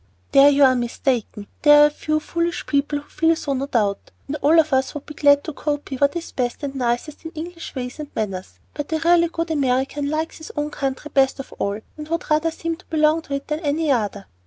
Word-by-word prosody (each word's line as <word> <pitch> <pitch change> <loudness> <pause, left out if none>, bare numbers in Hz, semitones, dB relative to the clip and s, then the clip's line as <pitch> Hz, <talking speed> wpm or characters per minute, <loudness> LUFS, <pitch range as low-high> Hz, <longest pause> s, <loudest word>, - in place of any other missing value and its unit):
"There 280 0 +8
you 285 0 +4
are 260 -1 +7
mistaken. 240 -3 -2 0.2
There 295 0 +8
are - - +8
a 295 - +2
few 310 +1 -1
foolish 340 +2 -2
people 290 +1 0
who - - -21
feel 325 0 +2
so 285 -3 -3
no 270 +1 -2
doubt, 205 -7 0 0.2
and 285 - -4
all 305 +3 +4
of 310 -3 +2
us 265 +2 +1
would 290 - -6
be 300 - -9
glad 285 -1 +4
to 315 - -6
copy 290 -1 -3
what 280 +4 +2
is 340 -1 -5
best 245 +3 -3
and 275 -1 -3
nicest 250 +3 -2
in 325 - -5
English 335 +1 -7
ways 250 +2 -5
and 300 -1 -6
manners, 195 -4 -4 0.2
but 295 +1 -5
a - - +2
really 340 +1 +4
good 330 0 -3
American 275 0 0
likes 315 +2 -3
his 315 - -9
own 295 0 -2
country 275 +2 -4
best 270 0 +3
of 270 - -8
all, 200 +1 -1 0.2
and 300 0 -7
would 330 -1 -3
rather 310 +2 +3
seem 330 0 -4
to 365 - -20
belong 310 0 +2
to 280 -3 -4
it 275 - -5
than 300 0 -2
any 305 -1 0
other." 205 -5 -1
290 Hz, 235 wpm, -22 LUFS, 265-315 Hz, 0.2 s, There